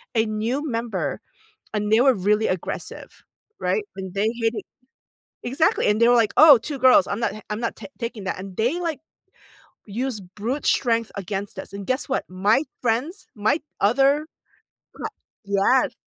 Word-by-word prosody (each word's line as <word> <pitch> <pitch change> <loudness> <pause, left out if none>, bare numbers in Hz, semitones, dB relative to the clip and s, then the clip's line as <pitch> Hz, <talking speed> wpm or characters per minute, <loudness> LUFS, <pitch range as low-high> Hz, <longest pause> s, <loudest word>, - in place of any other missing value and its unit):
a 220 - +3
new 230 +8 -2
member, 230 -1 -2 0.5
and 210 0 -1
they 225 - +6
were 260 0 +5
really 210 +3 +1
aggressive, 185 -2 -5 0.4
right? 435 - 0
And 190 -1 -7
they 205 +2 +1
hit 225 +1 +2
it - - -5 0.8
Exactly, 275 +7 +1
and 210 +2 +2
they 235 - +6
were 245 - +6
like, 215 - -1
"Oh, 300 -4 +10
2 280 +4 -5
girls, 260 +3 +6
I'm - - -3
not 230 - 0
h 215 -1 -10
I'm 210 +1 -3
not 230 - -2
ta - - -9
taking 230 -4 -5
that, 190 - -2
and 190 -1 -8
they, 250 +11 +1
like, 330 -4 -2 0.9
use 235 +2 -3
brute 215 +10 -4
strength 230 -3 +1
against 200 +1 -5
us, - - -9
and 200 -1 -6
guess 260 +3 0
what? 265 - 0
My 200 +7 +2 0.2
friends, 260 - -1
my 215 +9 +1 0.2
other 275 +8 +3 0.7
cla - - -5 0.4
Yes. 240 +7 +2
230 Hz, 170 wpm, -23 LUFS, 205-265 Hz, 0.9 s, Oh